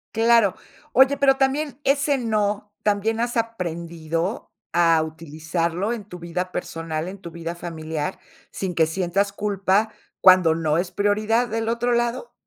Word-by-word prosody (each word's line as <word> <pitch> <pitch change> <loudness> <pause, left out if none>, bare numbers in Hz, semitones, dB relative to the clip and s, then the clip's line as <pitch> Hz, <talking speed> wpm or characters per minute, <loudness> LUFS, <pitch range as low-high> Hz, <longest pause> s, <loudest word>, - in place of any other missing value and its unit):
Claro. 225 -3 +4 0.4
Oye, 265 +1 +5
pero 270 -1 +4
también 275 +1 0
ese 280 +1 +2
no, 210 -3 -1
¿también 210 +2 +1
has 240 0 -1
aprendido 170 -4 -3 0.2
a 165 -2 +4
utilizarlo 165 +5 -3
en 230 -3 -5
tu 180 -3 -10
vida 180 +2 -4
personal, 165 -2 -4
en 190 +2 -7
tu 170 -3 -9
vida 170 +1 -5
familiar, 160 0 -5 0.3
sin 185 -3 -4
que 160 -1 +4
sientas 190 +4 0
culpa, 205 +1 0 0.3
cuando 185 -3 +6
no 160 -1 0
es 180 +1 -1
prioridad 215 +4 +1
del 225 0 -2
otro 240 +1 0
lado? 240 - -1
195 Hz, 145 wpm, -23 LUFS, 170-230 Hz, 0.4 s, cuando